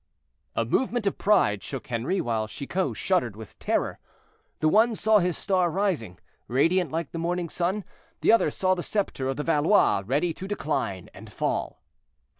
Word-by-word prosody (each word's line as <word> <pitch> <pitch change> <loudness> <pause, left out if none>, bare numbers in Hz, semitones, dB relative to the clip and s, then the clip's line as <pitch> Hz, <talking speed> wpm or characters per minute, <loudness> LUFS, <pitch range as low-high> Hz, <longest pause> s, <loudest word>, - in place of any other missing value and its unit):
A - - +1
movement 245 -4 0
of 200 - -1
pride 105 - +3
shook - - -6
Henri, 125 +12 0
while 110 -2 -1
Chicot 140 - -3
shuddered 145 - 0
with 110 -1 -12
terror. - - -1 0.6
The 155 - +2
one 220 +7 +4
saw 215 0 +4
his 180 -2 0
star 185 -3 +1
rising, 165 - -1 0.3
radiant 165 +6 +2
like 165 -2 -3
the 165 - -5
morning 175 0 -1
sun; 185 +6 -1 0.4
the - - +5
other 230 - +4
saw 185 -1 +1
the 180 - -2
scepter 190 -10 -2
of 135 - -2
the 150 - -2
Valois 160 - +3
ready 150 +7 +1
to 190 - -7
decline 135 - -3
and - - -12
fall. - - -2
170 Hz, 170 wpm, -26 LUFS, 130-190 Hz, 0.6 s, the